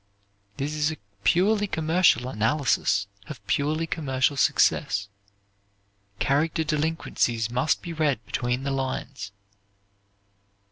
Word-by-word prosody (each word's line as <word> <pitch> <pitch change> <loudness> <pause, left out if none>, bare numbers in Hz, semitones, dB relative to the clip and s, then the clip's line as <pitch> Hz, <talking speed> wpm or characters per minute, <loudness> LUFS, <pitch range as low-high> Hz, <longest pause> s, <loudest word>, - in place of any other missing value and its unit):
This 145 +2 -2
is 150 0 +1
a 155 - -5 0.3
purely 205 +4 +3
commercial 160 -7 +2
analysis 130 -3 +1 0.2
of 100 - -9
purely 155 +8 0
commercial 140 -4 0
success. 100 -6 +2 1.1
Character 155 +7 +1
delinquencies 150 -7 -1
must 125 +5 +1
be 170 - -5
read 145 -8 0
between 125 +1 -2
the 140 - -1
lines. 130 -7 -4
145 Hz, 100 wpm, -25 LUFS, 125-160 Hz, 1.1 s, purely